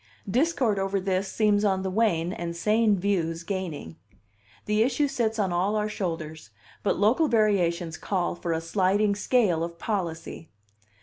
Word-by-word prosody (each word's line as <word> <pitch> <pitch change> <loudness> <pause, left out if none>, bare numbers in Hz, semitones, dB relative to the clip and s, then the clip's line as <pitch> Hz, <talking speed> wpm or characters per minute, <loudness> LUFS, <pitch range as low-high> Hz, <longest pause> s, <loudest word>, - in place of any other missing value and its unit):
Discord 245 - +1
over 195 +1 0
this 190 0 -1
seems 210 -1 +2
on 190 -2 +1
the 190 - -2
wane, 185 -5 +1
and 170 0 -5
sane 210 +3 +2
views 170 -4 -1
gaining. 170 - -5 0.7
The 210 +1 +1
issue 260 +5 +2
sits 235 -5 -1
on 195 -4 0
all 190 +5 +1
our 210 0 0
shoulders, 160 - -5 0.3
but 205 - 0
local 230 - +3
variations 180 - +1
call 185 -3 -1
for 175 0 -4
a 160 0 -1
sliding 195 +4 +1
scale 205 -5 +1
of 170 0 -6
policy. 170 -5 -4
195 Hz, 150 wpm, -26 LUFS, 170-215 Hz, 0.7 s, local